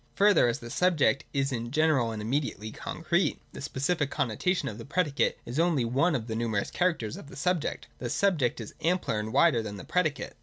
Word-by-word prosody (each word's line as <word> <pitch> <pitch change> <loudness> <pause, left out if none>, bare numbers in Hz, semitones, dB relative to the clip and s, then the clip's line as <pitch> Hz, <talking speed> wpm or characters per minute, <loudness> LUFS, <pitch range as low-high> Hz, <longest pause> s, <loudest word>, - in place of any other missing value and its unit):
Further, 200 -9 +5
as 120 - 0
the 120 0 -9
subject 150 -9 +2
is 135 -1 0
in 120 -2 -3
general 150 -4 +2
and 110 -1 -5
immediately 110 -3 -2
concrete, - - -1
the - - -8
specific 145 +2 -1
connotation 145 - 0
of 110 -2 -5
the - - -6
predicate 145 0 0
is 120 +6 -3
only 165 -7 +2
one 140 +8 +2
of 115 -4 -2
the 110 -1 -4
numerous 110 -3 -1
characters 165 - 0
of 145 - -11
the - - -11
subject. 175 +1 -1
Thus 120 -2 -3
the - - -2
subject 165 -14 +2
is 115 - -7
ampler 170 -10 +1
and 105 +1 -4
wider 150 -3 +4
than 105 -2 -6
the - - -8
predicate. 155 -6 -1
135 Hz, 205 wpm, -28 LUFS, 115-165 Hz, -, Further